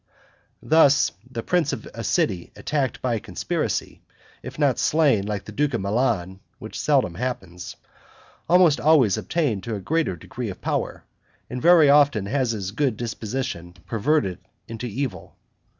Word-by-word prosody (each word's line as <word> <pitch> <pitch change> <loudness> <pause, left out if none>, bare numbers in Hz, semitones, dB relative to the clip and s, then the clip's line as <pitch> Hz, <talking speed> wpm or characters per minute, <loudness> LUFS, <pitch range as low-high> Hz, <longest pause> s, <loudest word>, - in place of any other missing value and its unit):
Thus 145 -3 +4 0.2
the 115 -3 -5
prince 175 -2 +1
of - - -6
a - - -6
city 85 -2 0
attacked 140 -4 -2
by 125 -2 +1
a 115 - -1
conspiracy, - - -3 0.4
if 130 +1 -9
not 145 -4 +2
slain 140 -11 +2
like 105 -2 -3
the - - -8
duke 140 +3 0
of 115 - -2
Milan 100 -3 -1 0.2
(which - - -8
seldom 85 - +2
happens), 95 -5 -5 0.7
almost 170 -6 +5
always 140 - +4
attains 145 - -1
to 115 -2 -3
a - - -4
greater 155 - -1
degree 80 - -6
of - - -8
power, - - -3 0.5
and 125 - -4
very 170 -3 +6
often 140 -7 +4
has 130 +3 0
his 100 -4 -3
good 125 -1 0
disposition 115 -6 -4
perverted 115 - 0 0.4
to 125 - -4
evil. 120 -3 -5
125 Hz, 150 wpm, -23 LUFS, 100-145 Hz, 0.7 s, very